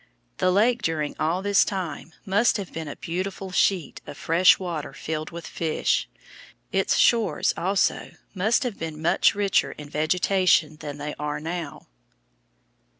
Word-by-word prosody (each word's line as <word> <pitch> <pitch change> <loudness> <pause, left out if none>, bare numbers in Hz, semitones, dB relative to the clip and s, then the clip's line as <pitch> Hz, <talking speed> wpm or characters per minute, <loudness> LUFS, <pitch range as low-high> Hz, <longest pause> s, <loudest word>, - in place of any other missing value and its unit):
The 185 - +2
lake 230 +6 +3
during 155 -3 -2
all 165 +5 0
this 205 -1 +4
time 180 -4 -5
must 205 +6 +2
have 195 -3 -7
been 160 -1 -5
a 145 - -6
beautiful 190 +2 -4
sheet 180 -4 +1
of 145 - -8
fresh 170 +3 +4
water 170 -5 -5
filled 155 0 -4
with 170 -1 -8
fish. 160 -2 -1 0.6
Its - - +1
shores, 230 -2 +3
also, 190 +3 0 0.2
must 215 +7 +1
have 240 -5 -4
been 160 -2 -5
much 160 +4 +3
richer 200 -1 +1
in 145 -1 -11
vegetation 170 0 +2
than 145 -2 -7
they 150 +1 -5
are 150 0 -3
now. 165 -1 -6
[Illustration: - - -40
FIG. - - -44
54. - - -43
170 Hz, 160 wpm, -25 LUFS, 150-195 Hz, 0.6 s, this